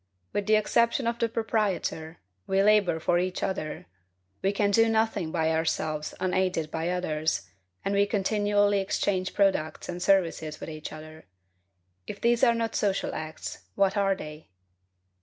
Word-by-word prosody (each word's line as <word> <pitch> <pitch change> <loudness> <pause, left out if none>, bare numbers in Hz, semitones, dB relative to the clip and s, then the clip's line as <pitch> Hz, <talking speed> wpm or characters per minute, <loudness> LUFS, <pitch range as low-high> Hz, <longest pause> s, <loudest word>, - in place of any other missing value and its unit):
With 205 0 -1
the 215 - +5
exception 235 +4 +2
of 235 0 -1
the 230 - +1
proprietor, 205 -8 -1 0.3
we 195 0 +2
labor 205 -5 +4
for 175 +2 +2
each 180 +1 -2
other; 155 -5 -3 0.6
we 195 - +2
can 200 0 +1
do 225 +2 +4
nothing 220 -7 0
by 160 -1 +1
ourselves 155 -1 -1
unaided 185 -4 0
by 160 +1 -2
others, 155 - -1 0.4
and 195 - 0
we 200 0 +3
continually 205 0 +2
exchange 190 -1 -1
products 190 -6 +1
and 175 0 -5
services 165 -5 +1
with - - -7
each 155 -1 -7
other. 155 0 -11 0.8
If 200 - -6
these 235 +1 +2
are 235 -2 +5
not 230 -1 -2
social 195 -2 0
acts, 155 0 -6 0.2
what 195 0 +2
are 195 -1 +2
they? 155 - -10
190 Hz, 155 wpm, -27 LUFS, 160-205 Hz, 0.8 s, the